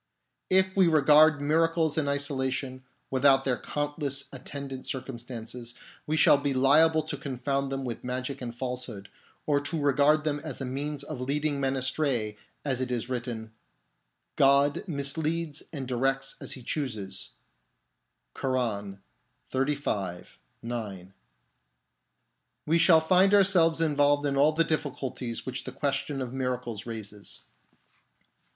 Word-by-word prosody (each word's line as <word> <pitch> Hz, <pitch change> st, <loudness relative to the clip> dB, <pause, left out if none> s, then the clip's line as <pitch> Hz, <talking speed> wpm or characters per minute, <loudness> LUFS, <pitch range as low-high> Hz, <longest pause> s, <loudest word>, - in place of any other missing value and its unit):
1 190 Hz, -, +6 dB
If 190 Hz, 0 st, 0 dB
we 190 Hz, -2 st, +5 dB
regard 155 Hz, -1 st, +5 dB
miracles 160 Hz, +1 st, +2 dB
in 155 Hz, -3 st, 0 dB
isolation, 135 Hz, -2 st, -2 dB, 0.3 s
without 135 Hz, 0 st, +4 dB
their 125 Hz, -2 st, 0 dB
countless 145 Hz, -1 st, -2 dB
attendant 135 Hz, 0 st, -7 dB
cir 130 Hz, -, -2 dB
cumstances, 120 Hz, -1 st, -8 dB, 0.3 s
we 155 Hz, +1 st, 0 dB
shall 145 Hz, -, +6 dB
be 140 Hz, -1 st, -1 dB
liable 155 Hz, +4 st, +5 dB
to 155 Hz, -1 st, -4 dB
confound 135 Hz, 0 st, -2 dB
them 135 Hz, 0 st, -3 dB
with 120 Hz, -2 st, -5 dB
magic 125 Hz, +2 st, -4 dB
and 120 Hz, -1 st, -5 dB
falsehood, 125 Hz, -5 st, -5 dB, 0.4 s
or 145 Hz, -2 st, +2 dB
to 150 Hz, +3 st, -1 dB
regard 145 Hz, +2 st, +3 dB
them 150 Hz, -1 st, -1 dB
as 145 Hz, -3 st, -7 dB
a 135 Hz, -, -3 dB
means 140 Hz, +3 st, -3 dB
of 145 Hz, -3 st, -6 dB
leading 145 Hz, +2 st, -1 dB
men 135 Hz, 0 st, 0 dB
astray, 130 Hz, -5 st, 0 dB, 0.3 s
as 130 Hz, -3 st, -1 dB
it 125 Hz, -1 st, -2 dB
is 120 Hz, 0 st, -2 dB
written, 120 Hz, -3 st, -4 dB, 0.4 s
" -, -, -50 dB
God 140 Hz, +1 st, +4 dB
misleads 155 Hz, +1 st, -1 dB
and 140 Hz, -5 st, -5 dB
directs 135 Hz, +2 st, 0 dB
as -, -, -3 dB
He 130 Hz, -, -10 dB
chooses 115 Hz, -9 st, -4 dB, 0.5 s
" -, -, -51 dB
{Koran, 105 Hz, -7 st, -2 dB, 0.5 s
xxxv. 130 Hz, -10 st, -2 dB, 0.3 s
9); 100 Hz, -6 st, -6 dB, 1.5 s
we 165 Hz, +2 st, +2 dB
shall 165 Hz, -2 st, +6 dB
find 185 Hz, +4 st, +5 dB
ourselves 180 Hz, -5 st, +5 dB
involved 145 Hz, -2 st, +2 dB
in 140 Hz, -1 st, 0 dB
all 145 Hz, +3 st, +5 dB
the 165 Hz, +2 st, +3 dB
difficulties 135 Hz, -6 st, -3 dB
which 130 Hz, -1 st, -3 dB
the -, -, -6 dB
question 140 Hz, -1 st, -2 dB
of 125 Hz, 0 st, -7 dB
miracles 125 Hz, -4 st, -3 dB
raises. 105 Hz, -3 st, -5 dB
135 Hz, 140 wpm, -28 LUFS, 125-150 Hz, 1.5 s, 1